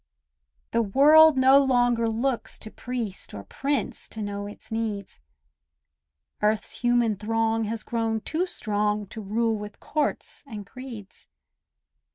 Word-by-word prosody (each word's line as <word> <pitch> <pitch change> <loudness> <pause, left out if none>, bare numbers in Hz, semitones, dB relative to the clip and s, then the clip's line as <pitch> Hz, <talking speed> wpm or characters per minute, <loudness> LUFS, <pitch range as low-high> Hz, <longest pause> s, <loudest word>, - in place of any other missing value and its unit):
The 230 - +2
world 295 +7 +6
no 265 +1 +7
longer 245 -3 +3
looks 235 +3 -1
to 220 - -9
priest 235 - -5
Or 100 - -7
prince 275 - -2
to 220 - -5
know 205 0 -4
its 205 - -12
needs; 215 - -3 1.2
Earth's 210 +1 0
human 240 -2 +3
throng 225 +1 0
has 220 +1 -4
grown 225 -1 -1
too 335 - -1
strong 210 - -1
To 220 - -7
rule 225 +3 0
with 210 0 -8
courts 300 -1 -2
and 210 -5 -7
creeds. 235 -5 -10
225 Hz, 130 wpm, -26 LUFS, 210-250 Hz, 1.2 s, no